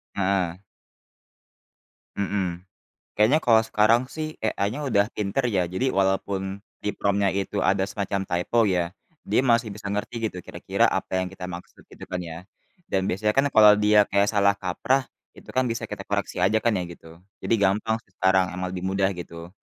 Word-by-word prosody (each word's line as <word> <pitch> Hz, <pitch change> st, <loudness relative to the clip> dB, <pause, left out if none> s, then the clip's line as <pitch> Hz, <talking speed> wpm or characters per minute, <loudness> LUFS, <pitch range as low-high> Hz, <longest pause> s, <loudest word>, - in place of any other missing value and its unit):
Heeh. 95 Hz, -3 st, 0 dB, 1.6 s
Mhm, 95 Hz, -3 st, -2 dB, 0.5 s
kayaknya 120 Hz, +9 st, +4 dB
kalau 115 Hz, -4 st, +4 dB
sekarang 110 Hz, +3 st, +3 dB
sih 155 Hz, 0 st, -5 dB
AI-nya 110 Hz, +6 st, -1 dB
udah 105 Hz, -6 st, +2 dB
pinter 105 Hz, +5 st, 0 dB
ya. 95 Hz, -5 st, +1 dB
Jadi 95 Hz, +10 st, -1 dB
walaupun 95 Hz, -1 st, -1 dB, 0.2 s
di 105 Hz, -, 0 dB
prompt-nya 100 Hz, -1 st, +1 dB
itu 100 Hz, 0 st, -3 dB
ada 95 Hz, +1 st, +2 dB
semacam 100 Hz, -1 st, -2 dB
typo, 100 Hz, +5 st, +1 dB
ya, 90 Hz, -1 st, 0 dB, 0.3 s
dia -, -, +2 dB
masih 115 Hz, -4 st, +2 dB
bisa 100 Hz, 0 st, -7 dB
ngerti 110 Hz, +3 st, -2 dB
gitu 90 Hz, -3 st, -9 dB
kira-kira -, -, -1 dB
apa -, -, -2 dB
yang -, -, -5 dB
kita 90 Hz, -1 st, -7 dB
maksud 90 Hz, 0 st, -10 dB
gitu -, -, -11 dB
kan 90 Hz, -1 st, -4 dB
ya. 85 Hz, -2 st, -7 dB, 0.5 s
Dan 95 Hz, 0 st, -1 dB
biasanya 105 Hz, +3 st, 0 dB
kan 135 Hz, +3 st, +2 dB
kalau 105 Hz, -4 st, +7 dB
dia 105 Hz, 0 st, +5 dB
kayak 100 Hz, +1 st, +3 dB
salah 100 Hz, -2 st, +3 dB
kaprah 110 Hz, +7 st, -1 dB, 0.2 s
itu -, -, -17 dB
kan 130 Hz, -, +3 dB
bisa 115 Hz, 0 st, -3 dB
kita -, -, -6 dB
koreksi -, -, -3 dB
aja 110 Hz, +3 st, +2 dB
kan 115 Hz, -3 st, +1 dB
ya 90 Hz, -, -1 dB
gitu. 80 Hz, -1 st, -15 dB, 0.2 s
Jadi -, -, +1 dB
gampang 105 Hz, +3 st, +1 dB
sih 95 Hz, -, -34 dB
sekarang 95 Hz, 0 st, +2 dB
emang 90 Hz, 0 st, -3 dB
lebih 90 Hz, -, -5 dB
mudah 95 Hz, 0 st, +1 dB
gitu. 85 Hz, -1 st, -8 dB
100 Hz, 175 wpm, -25 LUFS, 95-110 Hz, 1.6 s, kalau